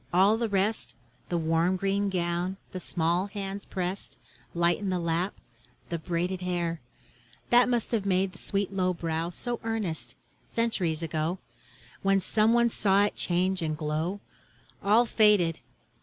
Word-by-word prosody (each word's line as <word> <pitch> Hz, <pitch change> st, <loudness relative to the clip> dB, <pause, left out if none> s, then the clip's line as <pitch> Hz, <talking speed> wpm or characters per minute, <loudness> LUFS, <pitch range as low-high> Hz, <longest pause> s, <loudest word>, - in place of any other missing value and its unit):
All 190 Hz, +5 st, +5 dB
the 230 Hz, 0 st, -1 dB
rest 200 Hz, +2 st, 0 dB, 0.3 s
The 175 Hz, -, 0 dB
warm 165 Hz, +3 st, +2 dB
green 195 Hz, +2 st, 0 dB
gown, 175 Hz, 0 st, -1 dB
the 185 Hz, -, -5 dB
small 175 Hz, +2 st, 0 dB
hands 200 Hz, -1 st, -5 dB
pressed 185 Hz, +1 st, -4 dB, 0.4 s
Light 170 Hz, 0 st, +2 dB
in 200 Hz, -2 st, -2 dB
the 185 Hz, -, 0 dB
lap, 170 Hz, +3 st, -1 dB, 0.5 s
the 170 Hz, -, -2 dB
braided 175 Hz, +3 st, -2 dB
hair 175 Hz, -3 st, -2 dB, 0.7 s
That 245 Hz, +1 st, +6 dB
must 240 Hz, -3 st, 0 dB
have 225 Hz, -4 st, +1 dB
made 190 Hz, -1 st, +1 dB
the 180 Hz, -, -14 dB
sweet 200 Hz, 0 st, -1 dB
low 185 Hz, -1 st, +1 dB
brow 165 Hz, 0 st, -2 dB
So 240 Hz, +7 st, -3 dB
earnest, 175 Hz, -, -3 dB, 0.3 s
centuries 180 Hz, -9 st, -1 dB
ago, 160 Hz, +2 st, -1 dB, 0.6 s
When 195 Hz, 0 st, +3 dB
some 215 Hz, +4 st, +2 dB
one 235 Hz, 0 st, +4 dB
saw 200 Hz, -2 st, +3 dB
it 205 Hz, -, 0 dB
change 185 Hz, +1 st, +1 dB
and 155 Hz, -2 st, -1 dB
glow 160 Hz, +6 st, -2 dB, 0.6 s
All 215 Hz, +4 st, +5 dB
faded! 210 Hz, -7 st, +3 dB
185 Hz, 150 wpm, -28 LUFS, 170-205 Hz, 0.7 s, That